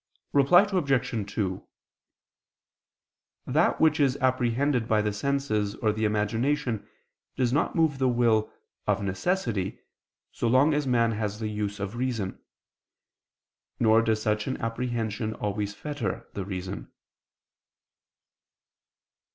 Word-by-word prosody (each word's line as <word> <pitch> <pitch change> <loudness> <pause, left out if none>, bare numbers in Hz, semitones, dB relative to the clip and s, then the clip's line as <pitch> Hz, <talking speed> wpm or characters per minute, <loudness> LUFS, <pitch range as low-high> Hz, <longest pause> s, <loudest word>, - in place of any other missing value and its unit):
Reply 145 +7 +6
Obj. 135 - 0
2: 95 -3 -3 1.8
That - - +2
which 155 -1 +4
is 135 -2 +3
apprehended 130 0 +1
by 110 -2 +3
the 105 -1 0
senses 110 -4 -1
or 110 - +1
the 110 +1 -1
imagination 115 +4 0 0.5
does 125 -1 +1
not 145 - +1
move 160 -5 +2
the 130 -1 +3
will, 115 -3 +2 0.4
of - - +1
necessity, 100 - -1 0.5
so 120 - -2
long 130 +6 +4
as 145 -1 0
man 115 -2 +3
has 105 -1 -3
the 110 -1 -2
use 105 -1 -3
of 100 +3 -4
reason; 120 -7 -3 1.4
nor 110 0 +5
does 110 -1 0
such 105 0 0
an 130 - -2
apprehension 115 -2 -2
always 100 0 -3
fetter 145 +2 -4
the 100 - -4
reason. 95 0 -6
115 Hz, 120 wpm, -27 LUFS, 105-135 Hz, 1.8 s, Reply